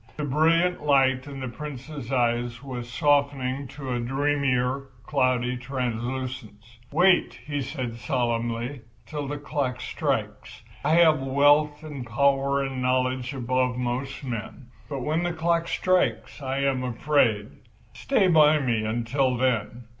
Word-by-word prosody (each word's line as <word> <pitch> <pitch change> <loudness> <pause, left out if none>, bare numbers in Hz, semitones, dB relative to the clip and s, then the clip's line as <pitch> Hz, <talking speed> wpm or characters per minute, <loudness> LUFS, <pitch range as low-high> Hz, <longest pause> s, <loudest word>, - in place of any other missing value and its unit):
The 150 - -3
brilliant 165 +5 +2
light 135 -2 +3
in 135 -1 -7
the 130 - -3
Prince's 140 0 -7
eyes 120 -1 0
was 125 -3 -6
softening 140 -2 +1
to 135 -1 -6
a 120 - -1
dreamier, 135 0 0 0.2
cloudy 125 -1 +1
translucence. 120 -3 -5
"Wait," 180 +4 +4
he 145 -1 -2
said 125 -4 -4
solemnly, 120 +1 -2 0.2
"till 145 -2 -5
the 145 +1 -3
clock 140 -3 -2
strikes. - - -3 0.2
I 150 +3 +2
have 160 -4 +5
wealth 145 +3 +3
and 145 -4 -6
power 140 +3 +2
and 135 -1 -4
knowledge 130 0 0
above 130 0 0
most 125 +3 -3
men, 120 0 -6 0.2
but 140 -3 -4
when 155 +4 0
the 175 0 -1
clock 170 0 0
strikes 185 -3 0
I 135 0 -2
am 135 -2 +1
afraid. 120 -4 +1 0.4
Stay 215 -8 +2
by 155 -3 +6
me 120 -6 0
until 120 +4 0
then. 120 -2 0
130 Hz, 135 wpm, -25 LUFS, 125-145 Hz, 0.4 s, by